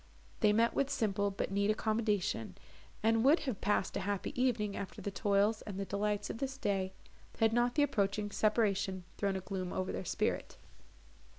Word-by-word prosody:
They 210 -3 +5
met 230 +2 +3
with 275 - +1
simple, 205 -6 +1
but 195 -1 -3
neat 200 +1 +1
accommodation, 215 - 0 0.5
and 225 0 +3
would 290 +6 +5
have 260 -9 -3
passed 205 -2 +1
a - - 0
happy 200 0 -2
evening, 215 -5 +1
after 195 - -6
the 200 - -4
toils 205 +3 +2
and 200 -2 -6
the 195 - -2
delights 205 +1 -1
of - - -7
this 270 -1 -3
day, 195 -7 -1 0.4
had 225 0 +3
not 240 +1 +2
the 295 - +4
approaching 205 -5 0
separation 200 -4 +1
thrown 200 -1 0
a 190 - -2
gloom 185 -1 -4
over 185 0 -2
their - - -4
spirit. - - -1
205 Hz, 180 wpm, -33 LUFS, 195-225 Hz, 0.5 s, They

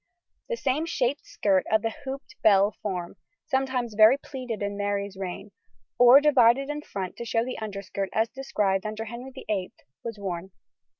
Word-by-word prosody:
The 475 - -1
same 295 - 0
shaped 275 -4 -1
skirt 190 -3 +2
of 220 -1 +3
the 225 - 0
hooped 270 +1 -7
bell 200 -1 +5
form 180 -4 -4 0.3
(sometimes 260 -4 -1
very 215 +5 +7
pleated 250 -6 -6
in 200 0 -2
Mary's 200 -1 -2
reign) 190 +2 -6 0.5
or 245 +2 +9
divided 275 -2 +4
in 295 0 -4
front 190 -10 -5
to - - -5
show 230 0 0
the 255 - -5
underskirt 200 -2 -4
as 220 +1 +2
described 210 -8 -1
under 215 +1 -4
Henry 240 +4 -7
VIII, 210 -8 -4 0.3
was 230 -2 -5
worn. 190 -2 -5
220 Hz, 165 wpm, -26 LUFS, 200-260 Hz, 0.5 s, or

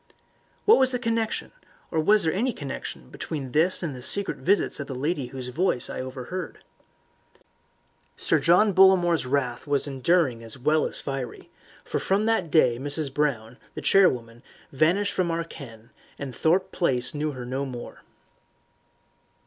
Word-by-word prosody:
What 430 - +7
was 260 -1 +4
the 250 - +1
connection, 230 -2 -2 0.4
or 160 - 0
was 205 +7 +4
there 160 - +1
any 240 +6 0
connection 135 - -7
between 140 -5 -5
this 165 +7 +2
and 150 -6 -3
the 125 - -9
secret 200 +10 +2
visits 200 -2 +1
of 140 - -5
the 135 - -6
lady 145 0 -2
whose 125 0 -7
voice 135 -2 0
I - - -6
had 130 - -4
overheard? 130 +7 -7 1.5
Sir - - +1
John 190 +5 +4
Bollamore's 180 -5 +4
wrath 125 -2 -1
was 145 -1 +1
enduring 135 -3 +1
as 115 +1 -9
well 150 +4 +2
as - - -8
fiery, 135 -4 -6 0.3
for - - -2
from 200 +3 +1
that 225 -7 +1
day 125 -7 +3
Mrs. 145 0 -3
Brown, 130 -5 -1 0.2
the - - -5
charwoman, 120 -11 +2 0.3
vanished 175 +9 +2
from 180 -2 0
our 165 0 -1
ken, 115 -8 -12 0.3
and 135 -3 -6
Thorpe 180 +4 +1
Place 130 -6 +1
knew 150 0 -2
her 125 -2 -7
no 130 +3 -3
more. 125 -3 -8
150 Hz, 160 wpm, -25 LUFS, 130-180 Hz, 1.5 s, What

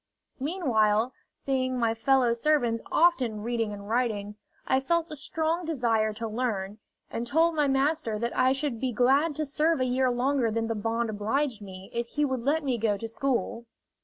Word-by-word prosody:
Meanwhile, 250 - +1 0.2
seeing 255 -1 -1
my 230 -2 +1
fellow 245 +1 +3
servants 235 -3 +1
often 255 -11 +2
reading 230 -2 -1
and 200 0 -8
writing, 215 -3 -1 0.3
I 260 - +2
felt 335 +4 0
a - - -5
strong 320 +4 -1
desire 235 -9 +1
to 225 +2 -4
learn, 215 -3 -3 0.3
and 235 +1 -3
told 325 +6 +3
my 300 -2 +2
master 270 -4 +1
that 235 +2 -3
I 255 0 +4
should 270 -3 -2
be 260 0 -1
glad 275 +7 +3
to 310 - -2
serve 305 +2 +1
a 255 - +2
year 255 +1 +2
longer 250 0 +1
than 225 +1 -1
the 225 - -1
bond 225 +1 -1
obliged 220 +3 -1
me 190 -1 -10
if 235 0 -2
he 295 +5 0
would 260 -3 -2
let 295 +5 +1
me 255 -4 -1
go 210 -2 +1
to 225 - -5
school. 235 -1 -2
245 Hz, 185 wpm, -27 LUFS, 225-280 Hz, 0.3 s, I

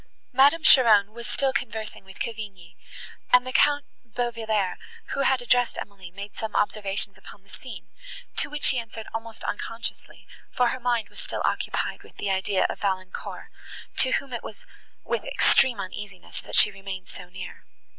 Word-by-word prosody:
Madame 285 +5 +5
Cheron 215 -7 +7
was 235 0 -7
still 270 -1 +1
conversing 220 -7 -4
with 190 0 -14
Cavigni; 205 -6 -6 0.6
and 250 0 +6
the 255 - -5
Count 290 +1 +4 0.2
Bauvillers, 225 -5 -1 0.4
who - - -3
had 265 -2 +2
addressed 245 0 +3
Emily, 195 -3 -8
made 200 +3 -9
some 220 -1 -5
observations 205 -1 +1
upon 195 - -13
the 195 - -25
scene, 255 +6 -10 0.5
to - - +1
which 295 0 -5
she 255 - +5
answered 225 -1 -7
almost 225 0 -6
unconsciously, 230 +2 -3 0.2
for 245 -1 +2
her 255 - -3
mind 240 -2 0
was - - -10
still - - -4
occupied - - -1
with - - -18
the 200 - -1
idea 190 0 +1
of - - -6
Valancourt, 190 -2 -3 0.5
to 260 - +3
whom 275 -2 -1
it 240 - -3
was 210 - -10 0.4
with - - -2
extreme 260 -3 +4
uneasiness 190 0 -7
that - - -6
she 210 - +8
remained 195 -1 -7
so 180 -1 -10
near. 185 0 -9
220 Hz, 165 wpm, -26 LUFS, 195-250 Hz, 0.6 s, she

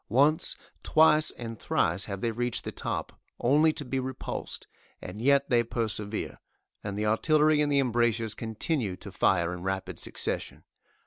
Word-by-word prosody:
Once, 145 +7 +3 0.3
twice 155 -1 +5
and 115 -2 -7
thrice 85 +4 +1
have 100 -2 -5
they 115 - 0
reached 120 +1 -2
the - - -5
top, - - -4 0.2
only 150 +6 +4
to 155 -2 -6
be 135 +1 -2
repulsed, 130 0 -5 0.3
and 95 +4 -8
yet 140 +2 +4
they 120 -1 +5
persevere, 110 -2 -3 0.4
and 100 0 -4
the 105 - -1
artillery 150 +7 +3
in 145 - +1
the 140 - +2
embrasures 120 -4 +1
continue 110 - -2
to - - -10
fire 90 -2 +2
in 90 - -7
rapid 95 +1 -3
succession. - - -2
120 Hz, 155 wpm, -28 LUFS, 105-140 Hz, 0.4 s, twice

